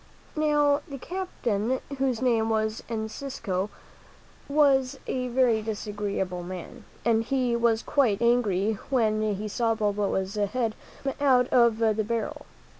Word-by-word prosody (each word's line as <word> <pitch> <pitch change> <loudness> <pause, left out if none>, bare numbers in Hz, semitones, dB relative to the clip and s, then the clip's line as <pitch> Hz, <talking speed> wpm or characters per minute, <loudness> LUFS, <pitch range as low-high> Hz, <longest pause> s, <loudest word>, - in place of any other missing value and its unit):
Now, 295 -1 +3
the 280 - -6
captain, 260 - -2 0.2
whose 260 -3 0
name 225 -3 +2
was 220 0 0
Encisco, 220 -3 -3 0.8
was 275 -2 +3
a 255 -1 -2
very 240 -3 +3
disagreeable 205 -4 -3
man, 185 +6 -8 0.2
and 225 -1 +3
he 250 -1 0
was 235 -1 +2
quite 245 -9 +2
angry 220 -4 +2
when 220 -5 +2
he 210 +2 -4
saw 225 +2 0
Balboa's 205 -2 0
head 215 +2 0 0.3
come 270 -1 -1
out 255 -3 +4
of 235 -3 +4
the 220 -1 +2
barrel. 235 +7 -3
230 Hz, 125 wpm, -27 LUFS, 215-260 Hz, 0.8 s, out